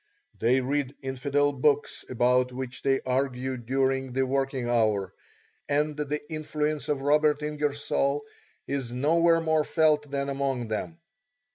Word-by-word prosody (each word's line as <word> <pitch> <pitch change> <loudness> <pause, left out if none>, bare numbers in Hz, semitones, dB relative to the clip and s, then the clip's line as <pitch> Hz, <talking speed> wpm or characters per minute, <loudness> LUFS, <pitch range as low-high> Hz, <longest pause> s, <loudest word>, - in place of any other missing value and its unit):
They 125 +3 +3
read 140 +1 -1
infidel 140 +2 0
books 145 +2 +1
about 125 +1 +2
which 125 0 -6
they 135 -1 +2
argue 130 0 -1
during 130 +1 -1
the 135 +1 +1
working 135 -1 -1
hour, 110 -5 +1 0.6
and 150 +1 +1
the 150 0 -2
influence 155 -1 -2
of 140 -2 -1
Robert 150 +1 +3
Ingersoll 145 -1 -1 0.4
is 135 -4 -3
nowhere 165 +6 +3
more 160 -1 +2
felt 150 -2 +2
than 140 0 -2
among 135 -4 -2
them. 110 +10 -3
140 Hz, 130 wpm, -27 LUFS, 130-150 Hz, 0.6 s, They